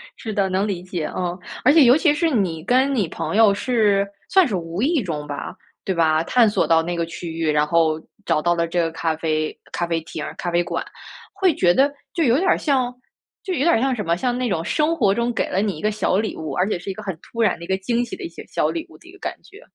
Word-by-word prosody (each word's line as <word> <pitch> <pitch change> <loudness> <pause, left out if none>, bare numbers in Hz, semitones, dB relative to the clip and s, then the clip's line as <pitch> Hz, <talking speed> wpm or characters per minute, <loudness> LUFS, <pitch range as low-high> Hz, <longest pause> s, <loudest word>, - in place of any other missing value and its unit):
是 220 -3 -6
的， 200 -1 +1
能 190 +3 0
理 190 -4 -3
解， 180 -3 -4
嗯。 180 -1 -2 0.3
而 290 - +7
且 320 -2 +7
尤 250 +2 +6
其 315 -2 +3
是 330 +2 +1
你 185 - -1
跟 260 +7 +2
你 205 -8 +1
朋 - - -4
友 220 -2 +6
是 205 -3 +2 0.2
算 380 -3 +5
是 215 - -2
无 170 +1 -4
意 290 0 +2
中 150 -5 -4
吧， 145 -1 -5 0.3
对 190 - -1
吧？ 160 -2 +2
探 230 +5 +4
索 205 - +1
到 165 -1 +4
那 175 +2 -3
个 170 -1 -1
区 170 +1 -7
域， 160 -1 0
然 150 0 +2
后 160 -1 +2 0.3
找 155 - +1
到 175 +2 +2
了 170 0 +1
这 175 +1 -1
个 165 - 0
咖 160 0 -1
啡 155 -1 -2 0.2
咖 175 - -1
啡 165 -1 -1
厅 160 - -7
儿 - - -6
咖 175 - -3
啡 175 0 +2
馆， - - -3 0.5
会 385 -3 +2
觉 175 -1 +4
得 280 +7 +3 0.2
就 335 - +2
有 245 -2 +4
点 370 +5 0
儿 - - +4
像 260 -4 0 0.5
就 380 - -3
有 345 - -2
点 330 +5 +4
儿 225 - +2
像 265 0 +1
什 215 -5 -3
么， 170 - +2
像 245 +7 -1
那 250 0 -1
种 165 -5 -1
生 305 - +1
活 200 -11 +3
中 235 +2 -1
给 - - -1
了 190 - 0
你 200 -5 -1
一 - - -9
个 215 - +1
小 205 -3 0
礼 215 +1 -2
物， 160 -1 -5
而 180 - +1
且 195 - -1
是 180 - -7
一 - - -2
个 215 - -9
很 190 -5 -4
突 230 - -5
然 220 - +2
的 170 - -8
一 - - -13
个 190 - +1
惊 235 +5 0
喜 235 - -7
的 - - -9
一 340 - -4
些 - - -11
小 - - 0
礼 330 -1 -4
物 - - -15
的 345 - -18
一 - - -12
个 390 - -17
感 - - -3
觉。 405 - -15
200 Hz, 305 characters per minute, -22 LUFS, 170-255 Hz, 0.5 s, 而